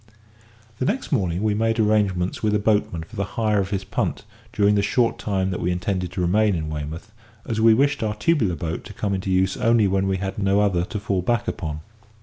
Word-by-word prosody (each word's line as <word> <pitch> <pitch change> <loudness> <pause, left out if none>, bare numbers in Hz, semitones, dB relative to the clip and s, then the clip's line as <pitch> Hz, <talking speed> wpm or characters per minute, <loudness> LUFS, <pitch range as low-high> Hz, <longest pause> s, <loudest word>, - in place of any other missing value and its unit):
The 130 - 0
next 235 - -2
morning 95 - 0
we 110 -1 +2
made 115 +2 0
arrangements 100 -4 +1
with 105 -1 +1
a - - +4
boatman 105 -6 0
for 80 - -14
the 100 - -1
hire 110 -2 +2
of 95 -1 -1
his 95 -1 -2
punt - - -2 0.3
during 105 0 +3
the 100 - +3
short 115 +4 +1
time 95 -2 -1
that 90 - -3
we 90 - -1
intended 90 0 -2
to 90 - -2
remain 100 +3 +2
in 80 -2 -3
Weymouth, 75 +7 -6 0.3
as 110 -1 -2
we 115 0 +6
wished 140 +3 +2
our 105 -1 -1
tubular 105 - +1
boat 80 +2 -4
to - - -9
come 100 -2 -2
into 95 0 -3
use 95 0 +1
only 115 -2 +3
when 95 0 +1
we 95 0 0
had 95 +1 -4
no 100 0 +2
other 95 -4 +2
to 105 - -5
fall 100 -2 -1
back 115 +4 0
upon. 75 -2 -4
100 Hz, 225 wpm, -23 LUFS, 90-110 Hz, 0.3 s, we